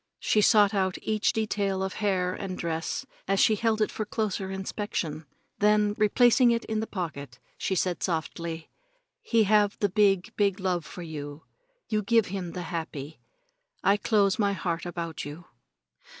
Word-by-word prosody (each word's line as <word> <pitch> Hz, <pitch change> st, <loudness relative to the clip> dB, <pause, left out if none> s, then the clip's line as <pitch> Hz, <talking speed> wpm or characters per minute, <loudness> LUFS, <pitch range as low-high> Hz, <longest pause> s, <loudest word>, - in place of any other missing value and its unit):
She 215 Hz, -, +2 dB
sought 205 Hz, 0 st, +5 dB
out 190 Hz, -2 st, 0 dB
each 215 Hz, -1 st, +1 dB
detail 200 Hz, -3 st, -1 dB
of 190 Hz, -, -3 dB
hair 185 Hz, -3 st, +1 dB
and 185 Hz, -1 st, -5 dB
dress 165 Hz, -1 st, -3 dB, 0.2 s
as 195 Hz, 0 st, +2 dB
she 220 Hz, -, +5 dB
held 220 Hz, 0 st, +1 dB
it -, -, -2 dB
for 215 Hz, -, -3 dB
closer 210 Hz, -3 st, -2 dB
inspection, 190 Hz, -5 st, -4 dB, 0.3 s
then 210 Hz, 0 st, +3 dB
replacing 240 Hz, +4 st, +4 dB
it 230 Hz, 0 st, +1 dB
in 220 Hz, -1 st, -2 dB
the 220 Hz, -, -3 dB
pocket 140 Hz, -9 st, -5 dB, 0.2 s
she 190 Hz, -, -2 dB
said 180 Hz, -1 st, 0 dB
softly: 165 Hz, -1 st, -3 dB, 0.5 s
"He 230 Hz, -, +3 dB
have 210 Hz, 0 st, +3 dB
the 205 Hz, -, +1 dB
big, 195 Hz, -2 st, +2 dB
big 200 Hz, -1 st, +1 dB
love 180 Hz, -4 st, -1 dB
for 180 Hz, -, -8 dB
you. 150 Hz, -2 st, -7 dB, 0.4 s
You 215 Hz, -1 st, 0 dB
give 225 Hz, +1 st, +3 dB
him 180 Hz, -3 st, -4 dB
the 180 Hz, -, -4 dB
happy. 160 Hz, -3 st, -5 dB, 0.6 s
I 200 Hz, -, +5 dB
close 205 Hz, -1 st, +2 dB
my 200 Hz, -2 st, +2 dB
heart 175 Hz, -2 st, -3 dB
about 170 Hz, -2 st, -5 dB
you." 150 Hz, +4 st, -8 dB
195 Hz, 165 wpm, -27 LUFS, 170-210 Hz, 0.6 s, sought